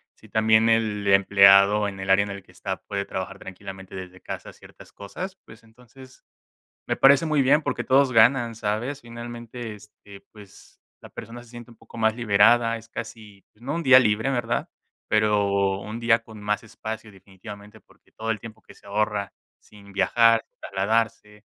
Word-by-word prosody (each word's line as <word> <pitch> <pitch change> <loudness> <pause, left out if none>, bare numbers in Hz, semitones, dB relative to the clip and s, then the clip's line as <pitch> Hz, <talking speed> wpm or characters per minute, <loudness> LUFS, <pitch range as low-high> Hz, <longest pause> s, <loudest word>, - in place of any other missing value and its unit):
si - - -19
también 110 +1 +3
el 110 -3 0
empleado 100 +1 +5
en 95 -1 -7
el 95 0 -6
área 95 +1 +5
en 100 - -6
el 100 -1 -8
que 90 - -21
está 95 +1 -5
puede 100 -1 -4
trabajar 95 +1 -6
tranquilamente 95 0 -10
desde 95 0 -9
casa - - -8
ciertas - - -17
cosas, 185 - -8
pues, 110 +2 -16
entonces 125 +3 -18 0.6
me - - -1
parece 140 +3 +5
muy 155 -2 +1
bien 145 +4 +3
porque - - -2
todos 135 0 +3
ganan, 115 +1 +4
¿sabes? 115 +6 -3
Finalmente, 120 -1 -8
este, 105 -1 -16
pues, 105 -3 -17 0.2
la - - -13
persona 120 +1 -10
se 120 - -18
siente 120 0 -11
un 115 - -17
poco 115 +1 -16
más 110 -1 +2
liberada, 115 +1 +3
es 115 0 -13
casi, 110 -3 -9
pues, 110 - -27
no 140 +4 -4
un 170 - -2
día 130 -2 +8
libre, 110 +1 +1
¿verdad? 120 -2 -2 0.4
Pero, 100 -2 +1
un 105 +3 -7
día 115 -1 +3
con 110 -2 -13
más 105 +1 -1
espacio 110 -1 -8
definitivamente, 100 +2 -13
porque, - - -28
todo 110 +1 -5
el 110 -2 -2
tiempo 110 0 -11
que - - -17
se - - -21
ahorra 105 -1 -2 0.3
sin 100 -1 -17
viajar, 115 +3 +3 0.2
trasladarse, 105 +1 -2
110 Hz, 180 wpm, -24 LUFS, 100-115 Hz, 0.6 s, día